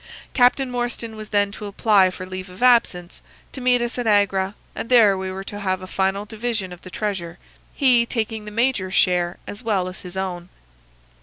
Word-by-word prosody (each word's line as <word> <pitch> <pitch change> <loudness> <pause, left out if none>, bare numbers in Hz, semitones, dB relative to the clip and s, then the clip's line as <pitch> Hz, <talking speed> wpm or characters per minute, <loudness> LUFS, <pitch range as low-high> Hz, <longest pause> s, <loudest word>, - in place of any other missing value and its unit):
Captain 250 +1 +3
Morstan 240 -2 -3
was 215 -1 -9
then 205 -1 +1
to 210 0 -7
apply 200 -2 +3
for 185 0 -7
leave 185 0 -7
of 185 +6 -7
absence, 195 -8 +3 0.3
to 265 - -6
meet 250 -1 +3
us 240 +1 -3
at 240 - -2
Agra, 200 -1 +2 0.2
and 230 - -6
there 225 -6 +6
we 190 0 -4
were 190 +1 -6
to 205 +1 -7
have 185 -2 -2
a - - -5
final 195 +2 -1
division 220 -4 -3
of 175 - -13
the 185 - -11
treasure, 185 -4 -4 0.4
he 255 -4 +5
taking 220 -2 -2
the - - -6
major's 210 -4 0
share 175 -1 +2
as 205 - -8
well 205 -6 0
as 185 - -8
his 180 0 -9
own. 180 -2 -4
205 Hz, 200 wpm, -22 LUFS, 185-230 Hz, 0.4 s, there